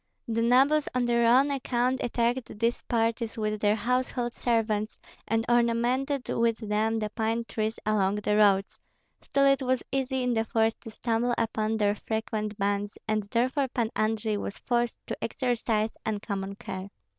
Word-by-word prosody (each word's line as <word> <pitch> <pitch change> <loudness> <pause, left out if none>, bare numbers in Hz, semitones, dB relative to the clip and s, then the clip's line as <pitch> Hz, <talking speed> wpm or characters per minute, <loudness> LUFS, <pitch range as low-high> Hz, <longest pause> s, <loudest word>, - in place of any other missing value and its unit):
The 230 0 0
nobles 270 +6 +4
on 250 -1 +2
their 235 -1 +3
own 265 +4 +5
account 255 -1 0
attacked 235 -1 -1
these 230 +2 0
parties 230 0 -1
with 215 -1 -2
their 210 0 +3
household 245 +2 -1
servants, 220 -2 0 0.3
and 225 0 +1
ornamented 240 +3 +1
with 230 -1 +1
them 220 0 0
the 215 -1 -2
pine 225 +1 -1
trees 220 0 -2
along 205 -2 +2
the 210 0 0
roads; 200 -2 +3 0.4
still 275 0 +1
it 275 0 +4
was 255 -1 0
easy 265 -1 0
in 250 -1 +1
the 225 -1 +1
forest 225 0 0
to 230 - -9
stumble 235 +2 0
upon 220 -1 0
their 205 -1 +2
frequent 215 -1 -3
bands, 200 +1 -1
and 215 -1 +1
therefore 255 +5 +1
Pan 235 -3 -1
Andrei 215 0 0
was 200 - -5
forced 240 -1 0
to - - -5
exercise 230 -3 0
uncommon 200 -2 -3
care. 190 -1 -7
230 Hz, 160 wpm, -28 LUFS, 215-245 Hz, 0.4 s, own